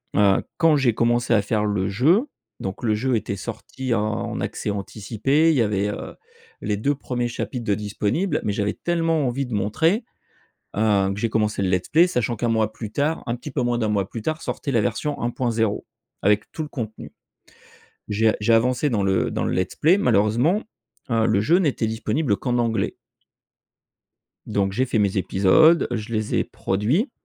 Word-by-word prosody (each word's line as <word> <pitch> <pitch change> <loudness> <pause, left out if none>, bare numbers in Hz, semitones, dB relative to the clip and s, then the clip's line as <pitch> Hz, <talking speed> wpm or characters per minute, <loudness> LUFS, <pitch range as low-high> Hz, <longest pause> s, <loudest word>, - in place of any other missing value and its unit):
Heu, 100 -1 +4
quand 165 -3 +4
j'ai 130 -4 +2
commencé 120 +1 +1
à 105 - +4
faire 105 0 0
le 100 -2 0
jeu, 160 - +3 0.3
donc 95 +4 -5
le 110 -2 +2
jeu 125 +3 0
était 105 -2 -2
sorti 130 +6 -5
en 105 -1 -2
accès - - -3
anticipé, 110 +10 0
il - - +1
y - - +4
avait, 105 -2 +1
heu, - - -6 0.5
les 105 - -1
2 140 +8 0
premiers 125 -3 -3
chapitres 120 0 -4
de 100 - +2
disponible, 105 - -1
mais 105 - -1
j'avais 105 0 -1
tellement 165 -4 0
envie 135 +3 -1
de 125 - -7
montrer, 160 - +1 0.7
heu, 100 -3 +2
que 100 - -6
j'ai 115 +1 0
commencé 105 -2 0
le 95 - +1
let's 90 -1 0
play, 170 +3 +5
sachant 120 -7 -1
qu'1 115 +2 -1
mois 110 -1 +1
plus 110 -1 -7
tard, 150 +5 -1
un 120 - -1
petit 135 +5 -8
peu 135 - -1
moins 120 -1 0
d'1 110 - 0
mois 100 -2 0
plus 115 - -6
tard 155 +7 -2
sortait 140 - -4
la 115 -4 +3
version 130 +7 -2
1.0 115 -3 -1 0.4
avec 105 +1 +1
tout 155 - -4
le 150 - -8
contenu. 110 -6 -7 0.9
J'ai 110 +1 +2
a - - +1
j'ai 110 +2 +2
avancé 125 +5 +2
dans 110 -6 0
le 95 -1 +1
dans - - -2
le - - -1
let's 90 0 -1
play. 170 +5 +4
Malheureusement, 125 - +2 0.5
heu, 115 -1 +2
le 105 -2 +2
jeu 165 +11 +4
n'était 145 -9 0
disponible 110 +1 -1
qu'en 125 -2 -1
anglais 115 -4 0 1.5
donc 100 -1 0
j'ai 130 +6 +1
fait 120 -3 0
mes 100 -1 +1
épisodes, 100 - +4
je 115 -1 -4
les 110 -1 -1
ai - - +2
produits 125 - -1
115 Hz, 190 wpm, -23 LUFS, 105-135 Hz, 1.5 s, play